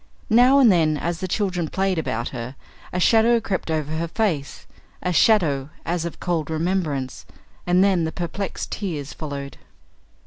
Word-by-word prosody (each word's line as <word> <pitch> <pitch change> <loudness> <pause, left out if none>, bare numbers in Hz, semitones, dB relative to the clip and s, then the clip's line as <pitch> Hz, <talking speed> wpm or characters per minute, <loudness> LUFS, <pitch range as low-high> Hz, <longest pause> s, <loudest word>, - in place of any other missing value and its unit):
Now 250 +4 +6
and 255 -6 +7
then, 160 -4 +3
as 170 +2 -3
the 185 - -3
children 180 -4 -1
played 190 -2 0
about 120 -6 -2
her, 125 +1 -6 0.4
a 180 - -2
shadow 230 +4 +4
crept 200 -6 -3
over 155 -2 -1
her 170 +1 -2
face 165 -7 -2 0.4
a 180 - 0
shadow 155 -10 +3 0.2
as 170 -1 -1
of 170 - -6
cold 165 -4 -1
remembrance 160 -5 -2 0.4
and 180 +1 +4
then 190 -4 +3
the 160 - -1
perplexed 175 +4 -4
tears 155 -9 -4
followed. 140 -3 -6
170 Hz, 160 wpm, -23 LUFS, 150-195 Hz, 0.4 s, and